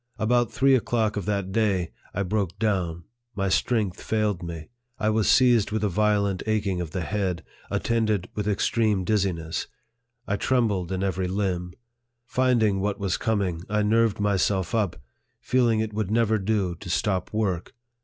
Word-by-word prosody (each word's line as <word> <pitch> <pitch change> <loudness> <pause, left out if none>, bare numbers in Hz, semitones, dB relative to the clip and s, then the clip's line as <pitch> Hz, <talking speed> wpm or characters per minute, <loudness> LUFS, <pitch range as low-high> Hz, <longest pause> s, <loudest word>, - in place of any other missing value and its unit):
About 120 +2 +2
three 135 0 +3
o'clock 115 -3 +1
of 100 -4 -3
that 100 -2 -1
day, 100 -5 +1 0.2
I 100 - -1
broke 100 -2 -1
down; 90 -6 -1 0.3
my 100 -1 0
strength 105 -2 0
failed 105 -4 0
me; 85 -2 -7 0.3
I 110 0 +1
was 110 -1 +2
seized 120 -5 +5
with 110 0 -2
a 105 - +2
violent 100 -1 +1
aching 100 -4 0
of 85 - -4
the 90 +2 -3
head, 95 -3 -2 0.3
attended 110 -5 0
with 105 -1 -3
extreme 105 -1 +1
diz 105 0 +2
ziness; 85 -3 -3 0.6
I 100 -1 0
trembled 105 -8 +1
in 95 0 -1
every 95 -1 -1
limb. 90 -2 -2 0.5
Finding 120 -6 +2
what 100 +1 -1
was 100 -3 -1
coming, 100 -7 -1
I 105 0 +1
nerved 110 0 +2
myself 95 -2 +1
up, 100 -6 +1 0.4
feeling 120 -4 +2
it 110 -1 -3
would 105 -2 -2
never 110 -1 +2
do 95 -3 0
to 90 +1 -10
stop 95 +1 0
work. 100 -5 -2
105 Hz, 165 wpm, -25 LUFS, 95-110 Hz, 0.6 s, seized